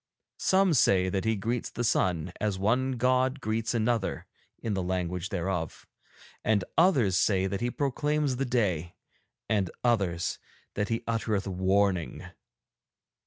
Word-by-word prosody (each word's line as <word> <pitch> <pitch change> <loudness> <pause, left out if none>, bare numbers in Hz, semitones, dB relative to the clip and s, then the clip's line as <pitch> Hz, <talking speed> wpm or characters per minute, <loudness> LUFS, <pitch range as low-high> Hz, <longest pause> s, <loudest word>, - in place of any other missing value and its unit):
Some 190 -2 +3
say 95 -8 +4
that 95 +2 -2
he 110 0 +2
greets 115 +4 -2
the 120 - -4
sun 90 -6 +1
as 105 -3 0
one 125 +7 +1
god 130 +2 +1
greets 115 0 -1
another 115 -2 0 0.3
in 110 - -3
the 95 - -1
language 90 0 -2
thereof, 85 -3 -3 0.6
and 105 -3 +2
others 135 - +4
say 95 0 +2
that 95 +2 -2
he 120 - 0
proclaims 145 +1 0
the 135 - 0
day, 95 -10 0 0.5
and 100 -4 +1
others 95 -8 0 0.3
that 105 0 -2
he 115 +1 -1
uttereth 110 -3 -1
warning. 95 -1 0
105 Hz, 135 wpm, -28 LUFS, 95-120 Hz, 0.6 s, say